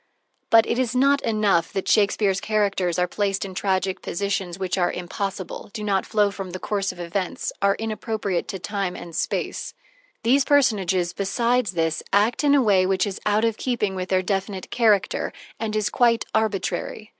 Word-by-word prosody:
IV - - -51
But 225 0 +6
it 235 - -1
is 255 -1 0
not 275 +2 +4
enough 205 -7 +1
that 195 - -3
Shakespeare's 200 -2 +2
characters 200 -5 0
are 180 - +3
placed 195 -2 -1
in 190 - -7
tragic 190 0 -1
positions 195 -2 -2
which 185 -2 -2
are 180 -2 +1
impossible, 190 +2 -5
do 215 -2 -5
not 195 -2 0
flow 210 -2 +2
from 195 -2 -6
the 185 +1 -6
course 200 -1 -1
of - - -14
events, 175 +2 -3
are 200 0 +3
inappropriate 215 -4 -3
to 195 - -4
time 195 -1 -3
and 170 -2 -9
space - - -2 0.5
these 265 +4 +4
personages, 195 - +2
besides 230 +2 0
this, 165 -1 0
act 210 +7 +2
in 285 -1 +5
a 275 - +4
way 190 -4 +4
which 190 -1 +1
is 200 -2 -5
out 210 +2 +3
of 225 -1 0
keeping 235 -6 -1
with 185 -1 -4
their 185 -1 +2
definite 195 0 -3
character, 220 -5 +2 0.3
and 220 -1 -2
is 210 -1 0
quite 235 -2 +3
arbitrary. 215 0 -1
200 Hz, 180 wpm, -23 LUFS, 185-220 Hz, 0.5 s, But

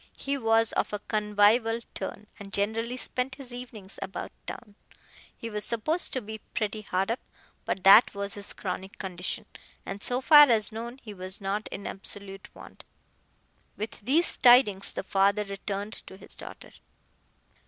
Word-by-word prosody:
He 280 0 -2
was 225 -3 +2
of - - 0
a 210 - -1
convivial 215 +2 +3
turn, 200 +2 -5
and 200 -1 -9
generally 225 +5 -1
spent 255 +1 -2
his 260 -3 -10
evenings 230 -6 -9
about 190 - -5 0.2
town. 210 -4 -8 0.6
He 230 - -6
was 210 -2 -3
supposed 275 - 0
to 260 - -1
be 220 0 -7 0.2
pretty 215 0 -1
hard 195 0 -1
up, 235 - -1 0.5
but 190 - -2
that 200 +3 +8
was 200 0 -4
his 205 0 -7
chronic 190 0 -5
condition, 185 +3 -4 0.4
and, 195 +1 -6
so 245 +3 +1
far 295 +1 +8
as 220 -3 +2
known, 235 +3 -6
he 215 -3 -8
was 185 0 -5
not 200 +2 -2
in 200 - -7
absolute 195 0 -6
want. - - -13 0.9
With 215 +2 -5
these 300 +11 +3
tidings 240 -6 +5
the - - -4
father 200 +2 +2
returned 200 +1 -5
to 190 - -10
his - - -12
daughter. - - -10
210 Hz, 160 wpm, -28 LUFS, 200-235 Hz, 0.9 s, that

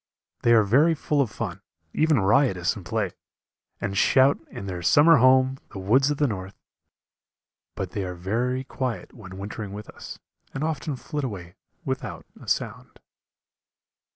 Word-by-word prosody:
They 120 - +4
are 110 -2 +6
very 145 +11 +4
full 150 -1 0
of 130 - 0
fun, - - -5 0.3
even 155 -4 +3
riotous 95 -3 +2
in 100 - -9
play, 105 0 -1 0.7
and 100 -1 -3
shout, 130 +7 +4
in 100 - -8
their 90 -2 -5
summer 150 - +6
home 130 +1 +4
the - - -7
woods 120 +9 +3
of 145 - -1
the 145 - +2
north 95 -5 -4 1.2
but 95 -2 -4
they 100 - -3
are 90 -1 -5
very 120 +8 -1
quiet 125 -7 -4
when 95 -5 -11
wintering 100 0 -6
with 105 +1 -8
us, - - -10 0.4
and 135 - -2
often 155 -2 -2
flit 145 +3 -5
away 95 -8 -6 0.3
without 125 - -4 0.2
a - - -13
sound. - - -3
115 Hz, 155 wpm, -25 LUFS, 95-135 Hz, 1.2 s, are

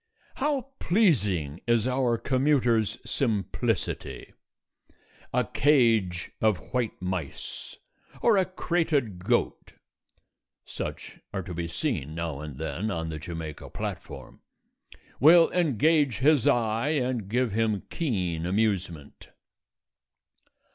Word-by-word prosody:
How 275 -2 -1
pleasing 105 - +1
is 120 -1 +3
our 125 -2 +1
commuter's 125 -5 +2
simplicity! 115 - -2 1.0
A - - +2
cage 115 - +2
of 110 -3 +3 0.2
white 125 -4 -1
mice, 90 -6 -5 0.4
or 230 - +4
a 190 - +2
crated 160 - -1
goat - - 0 0.9
(such - - -6
are 95 - -3
to 90 - -7
be 85 0 -3
seen 85 - -3
now 85 -4 -3
and 75 -3 -7
then 80 +8 -3
on 80 -5 -3
the 80 -1 -5
Jamaica 80 -3 -7
platform) - - -7 0.8
will 165 +4 +7
engage 155 - +2
his 145 0 +3
eye 115 +3 +2
and 125 -8 -1
give 125 +1 +1
him 110 -1 0
keen 90 - -1
amusement. 95 -7 -2
110 Hz, 105 wpm, -27 LUFS, 90-140 Hz, 1.0 s, will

